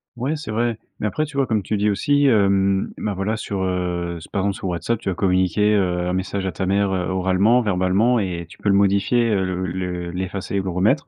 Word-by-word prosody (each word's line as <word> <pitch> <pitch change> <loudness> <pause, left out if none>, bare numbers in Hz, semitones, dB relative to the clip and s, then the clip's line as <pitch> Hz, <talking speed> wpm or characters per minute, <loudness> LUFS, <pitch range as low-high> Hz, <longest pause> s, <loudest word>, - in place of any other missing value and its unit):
Ouais, 130 +6 -2
c'est 145 -8 -6
vrai. 115 +1 0 0.2
Mais 105 - 0
après, 155 +9 -1
tu 150 -2 -9
vois, 135 - +2
comme 110 -3 0
tu 105 - -2
dis 105 +1 +1
aussi, 145 +7 +2
hem, 100 -4 +2
bah, 105 - -2
voilà, 100 +4 -1
sur, 100 -3 -3
heu, 90 -2 -2
s 80 - -11
par 100 - -2
exemple 100 +1 0
sur 95 - -5
WhatsApp, 90 +6 -1
tu 105 - -3
vas 95 - -2
communiquer, 95 +3 +2
heu, 90 -3 +1
un 90 - -1
message 95 +1 -2
à 95 - -1
ta 90 +3 -3
mère, 100 0 +2
heu, 90 -1 -1
oralement, 95 +6 +3
verbalement, 100 +5 +2
et 90 -4 -3
tu - - -16
peux 105 - 0
le 100 - +4
modifier, 100 +4 +2
heu, 95 -2 +1
le 95 0 -2
le 90 -1 -4
l'effacer 95 +2 -4
et - - +2
le 95 - -4
remettre. 100 - +1
95 Hz, 245 wpm, -21 LUFS, 90-110 Hz, 0.2 s, le